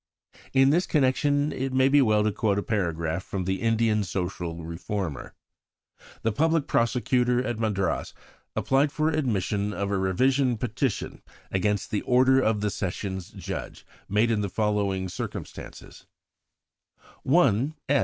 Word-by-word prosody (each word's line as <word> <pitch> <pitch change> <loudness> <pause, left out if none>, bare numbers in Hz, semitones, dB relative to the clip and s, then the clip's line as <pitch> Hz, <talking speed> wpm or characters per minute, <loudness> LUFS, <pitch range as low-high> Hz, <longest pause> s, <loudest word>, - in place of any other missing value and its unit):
In 135 0 +5
this 175 +4 +2
connection 145 +1 +2
it 135 0 -3
may 130 0 +4
be 145 +1 +5
well 110 -4 +3
to 105 - +1
quote 105 -1 0
a 100 - -1
paragraph 85 -4 -1
from 95 -2 -4
the 95 +1 -2
Indian 115 -2 +2
Social 90 -3 -4
Reformer: 85 -3 -5 0.9
"The 115 - +2
Public 160 +6 +1
Prosecutor 125 +1 +1
at 120 -3 -3
Madras 100 -5 -1 0.4
applied 140 +2 +2
for 155 +2 +1
admission 105 - -1
of 100 0 -2
a 100 - +1
revision 125 +7 +2
petition 120 +2 -2 0.3
against 100 +1 0
the 105 - 0
order 130 +1 +4
of 110 -5 +1
the 105 -1 0
Sessions 95 -1 -4
Judge, - - -7 0.2
made 105 +3 +2
in 110 -2 +1
the 100 - -2
following 100 -2 0
circumstances: 90 - -8 1.1
"One, 135 - +3
S. 145 0 +3
110 Hz, 140 wpm, -26 LUFS, 95-130 Hz, 1.1 s, In